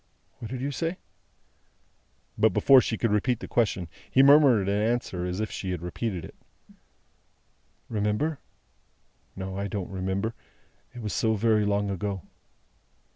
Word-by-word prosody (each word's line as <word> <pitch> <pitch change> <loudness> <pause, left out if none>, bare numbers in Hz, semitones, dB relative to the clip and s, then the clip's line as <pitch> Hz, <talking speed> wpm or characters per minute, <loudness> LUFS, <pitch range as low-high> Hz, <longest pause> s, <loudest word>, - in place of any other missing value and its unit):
"What 115 - -7
did 130 -1 -5
you 140 +2 -2
say?" 165 +5 -2 1.4
But, 110 -3 +3
before 135 -2 +7
she 115 - -2
could 115 - 0
repeat 115 +3 +1
the - - -7
question, 100 -7 0 0.2
he 135 - +5
murmured 135 -8 +6
an 100 +1 +1
answer 110 -6 -1
as 90 +2 -3
if 110 -1 -2
she 95 - -5
had 90 -2 -3
repeated 90 0 -3
it. - - -12 1.5
"Remember? 110 +8 -1 1.0
No, 95 0 -5
I 100 - -2
don't 100 -2 -5
remember. 95 +4 -2 0.6
It 120 - -7
was 105 - -3
so 110 -1 +1
very 110 0 +2
long 100 0 0
ago." 95 0 -3
105 Hz, 145 wpm, -27 LUFS, 95-120 Hz, 1.5 s, before